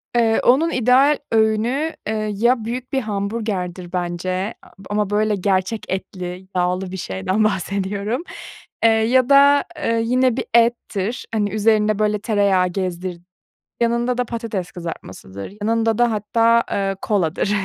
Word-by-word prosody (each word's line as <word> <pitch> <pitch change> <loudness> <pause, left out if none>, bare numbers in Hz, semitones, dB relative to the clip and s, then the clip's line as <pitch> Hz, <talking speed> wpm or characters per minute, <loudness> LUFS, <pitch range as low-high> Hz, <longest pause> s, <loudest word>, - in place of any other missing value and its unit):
Eee, 225 -2 +3
onun 305 +7 +4
ideal 260 +4 +4
öğünü, 225 +8 +1
eee, 215 0 -1
ya 235 +1 +2
büyük 245 +2 -5
bir 265 - +1
hamburgerdir 200 -4 -3
bence 185 +3 -2 0.4
ama 205 -1 0
böyle 210 0 +1
gerçek 190 +2 0
etli, 185 -1 -5
yağlı 180 +1 0
bir 190 - -5
şeyden 185 - -1
bahsediyorum 200 - -1 0.6
eee, 230 - +7
ya 235 +4 +3
da 280 +1 +6 0.4
yine 250 +1 +2
bir - - -2
ettir, 230 -2 +1
hani, 210 -2 +1
üzerinde 215 0 +2
böyle 210 0 +1
tereyağı 200 -4 +2
gezdir 180 -1 -4 0.6
yanında 235 +1 +1
da 250 - 0
patates 225 -6 -4
kızartmasıdır, 100 - -8
yanında 225 0 +1
da 240 -1 +3
hatta, 230 +2 +2
eee, 195 -1 -1
koladır. 195 -1 0
215 Hz, 130 wpm, -20 LUFS, 190-235 Hz, 0.6 s, eee